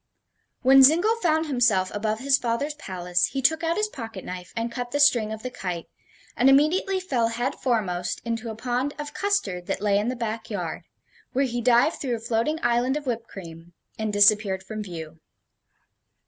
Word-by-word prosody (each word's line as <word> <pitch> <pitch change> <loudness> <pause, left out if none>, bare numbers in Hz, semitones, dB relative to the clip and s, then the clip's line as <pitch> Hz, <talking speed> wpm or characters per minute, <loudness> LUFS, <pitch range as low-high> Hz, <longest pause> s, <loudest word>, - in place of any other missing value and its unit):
When 270 +1 +7
Zingle 345 +11 +5
found 320 -6 +1
himself 230 -10 +2
above 215 +2 -2
his 275 +1 +3
father's 245 +5 -1
palace, 180 -9 -1
he 270 - -1
took 320 +5 +2
out 330 +1 0
his 425 0 +1
pocket 225 - -8
knife 180 -1 -7
and 230 +1 -2
cut 245 0 -4
the 290 - -2
string 240 -7 +4
of 220 0 -6
the 255 - -4
kite, 180 -7 -5 0.5
and 255 +3 +4
immediately 330 +8 +3
fell 260 -11 0
head 240 +4 -2
foremost 180 -8 -1
into 230 0 -3
a 220 - -5
pond 250 +5 -2
of 295 -1 -6
custard 400 - -1
that - - -2
lay 200 0 +2
in 210 - -2
the 250 - -1
back 230 -2 -4
yard, 180 -7 -4 0.5
where 275 +2 +2
he 240 -1 -3
dived 245 +5 +3
through 250 -4 -1
a - - -6
floating 230 +7 -1
island 240 +3 +2
of 300 - -7
whipped 235 -2 -3
cream 170 -2 -11 0.3
and 220 -1 -1
disappeared 205 -2 +4
from 215 +3 -6
view. 165 -5 -8
235 Hz, 190 wpm, -25 LUFS, 205-275 Hz, 0.5 s, When